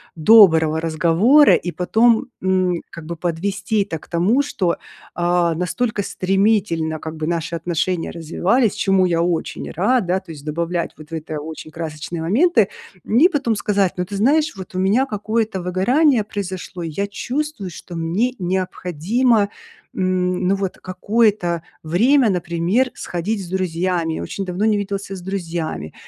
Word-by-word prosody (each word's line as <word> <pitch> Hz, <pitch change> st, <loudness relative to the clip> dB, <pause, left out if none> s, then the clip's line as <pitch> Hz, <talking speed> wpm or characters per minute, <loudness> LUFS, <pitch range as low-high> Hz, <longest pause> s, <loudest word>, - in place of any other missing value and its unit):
доброго 160 Hz, -4 st, +6 dB
разговора, 170 Hz, -, +5 dB
и 175 Hz, -, -3 dB
потом, 220 Hz, +6 st, +2 dB
м, 185 Hz, -2 st, +1 dB
как 165 Hz, -2 st, -10 dB
бы 170 Hz, +2 st, -5 dB
подвести 195 Hz, +5 st, -1 dB
это 165 Hz, -5 st, -5 dB
к -, -, -18 dB
тому, 185 Hz, +10 st, +2 dB
что, 185 Hz, -11 st, -1 dB, 0.4 s
а, 175 Hz, -1 st, +1 dB
настолько 205 Hz, +6 st, -1 dB
стремительно 190 Hz, -4 st, 0 dB
как 160 Hz, +1 st, -6 dB
бы 155 Hz, 0 st, -3 dB
наши 170 Hz, 0 st, -2 dB
отношения 170 Hz, +1 st, -1 dB
развивались, 190 Hz, +8 st, +1 dB
чему 195 Hz, -1 st, +2 dB
я 170 Hz, -2 st, +1 dB
очень 170 Hz, -1 st, -2 dB
рад, 215 Hz, +6 st, +1 dB
да, 185 Hz, +2 st, +1 dB
то 170 Hz, -, -12 dB
есть 145 Hz, -3 st, -10 dB
добавлять 170 Hz, +2 st, -2 dB
вот 155 Hz, -1 st, -13 dB
в -, -, -12 dB
это 155 Hz, -1 st, -4 dB
очень 155 Hz, +1 st, -8 dB
красочные 160 Hz, +1 st, -5 dB
моменты, 220 Hz, -, +3 dB, 0.4 s
и 265 Hz, -, +5 dB
потом 275 Hz, -9 st, 0 dB
сказать: 200 Hz, -3 st, +1 dB
"Ну, 180 Hz, -, -1 dB
ты 200 Hz, -, -7 dB
знаешь, 295 Hz, +8 st, +2 dB
вот 190 Hz, -1 st, -10 dB
у -, -, -1 dB
меня 205 Hz, +8 st, +3 dB
какое-то 215 Hz, -3 st, -2 dB
выгорание 230 Hz, -, +2 dB
произошло, 190 Hz, -3 st, -6 dB
и 165 Hz, -, -4 dB
я 200 Hz, +6 st, -2 dB
чувствую, 260 Hz, 0 st, -4 dB
что 175 Hz, +1 st, -10 dB
мне 175 Hz, +10 st, 0 dB
необходимо, 190 Hz, -, 0 dB, 0.5 s
м, 185 Hz, -1 st, 0 dB
ну 195 Hz, -, +3 dB
вот 195 Hz, -2 st, -3 dB
какое-то 185 Hz, -2 st, 0 dB, 0.2 s
время, 230 Hz, -, +3 dB
например, 180 Hz, +7 st, 0 dB
сходить 195 Hz, +5 st, -3 dB
с -, -, -9 dB
друзьями. 175 Hz, -2 st, -1 dB
Я -, -, -4 dB
очень 195 Hz, -, -4 dB
давно 185 Hz, +3 st, -2 dB
не 215 Hz, -1 st, +3 dB
виделся 200 Hz, -1 st, -4 dB
с 185 Hz, -, -8 dB
друзьями". 170 Hz, -, -4 dB
185 Hz, 155 wpm, -20 LUFS, 170-210 Hz, 0.5 s, доброго